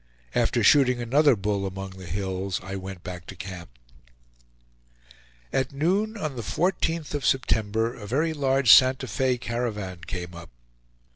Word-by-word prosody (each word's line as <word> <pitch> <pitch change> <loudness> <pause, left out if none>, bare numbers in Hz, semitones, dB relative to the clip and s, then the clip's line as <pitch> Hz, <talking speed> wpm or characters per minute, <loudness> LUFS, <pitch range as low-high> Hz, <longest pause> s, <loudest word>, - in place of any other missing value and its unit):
After - - +1
shooting 125 -4 +5
another 135 +4 +4
bull 100 -1 -1
among 95 0 -6
the 95 -1 -11
hills, 95 +1 -3
I 95 +1 -6
went 95 -1 -7
back 90 -2 -8
to 100 - -8
camp. 90 -2 -8 1.8
At 130 +1 0
noon, 195 +10 0
on 155 -8 -4
the 120 - -4
14th 165 - -1
of 145 -2 -2
September, 115 -3 +1
a 105 -5 -10
very 155 +8 0
large 135 -5 +3
Santa 130 0 +5
Fe 130 +3 0
caravan 110 -7 -4
came 90 -1 -5
up. 85 0 -10
115 Hz, 145 wpm, -25 LUFS, 95-135 Hz, 1.8 s, shooting